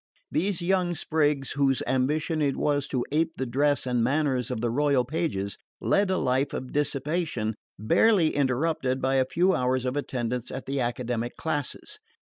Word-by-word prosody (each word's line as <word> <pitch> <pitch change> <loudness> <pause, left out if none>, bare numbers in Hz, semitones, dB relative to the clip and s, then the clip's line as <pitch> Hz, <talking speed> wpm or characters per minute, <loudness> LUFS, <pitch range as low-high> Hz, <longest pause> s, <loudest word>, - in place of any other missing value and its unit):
These 185 0 0
young 180 -1 +1
sprigs, 150 -4 +1
whose 135 -2 +2
ambition 150 +5 0
it 140 -2 +1
was 145 -1 0
to 130 -3 -1
ape 160 +2 +1
the 130 - -1
dress 140 +3 +1
and 125 -2 +1
manners 130 -2 +1
of 125 -3 -3
the 120 0 -1
royal 140 -1 +2
pages, 125 - -2 0.2
led 200 -1 +2
a 185 - +1
life 130 +2 0
of 130 - -6
dissipation 145 -5 -1 0.2
barely 165 - +3
interrupted 135 -1 0
by 135 +1 +1
a 130 - +3
few 185 +2 +3
hours 130 -2 0
of 125 +1 -1
attendance 125 -4 -3
at 130 - -6
the 135 +1 -2
academic 120 -1 -2
classes. 160 - -3
140 Hz, 165 wpm, -26 LUFS, 125-155 Hz, 0.2 s, barely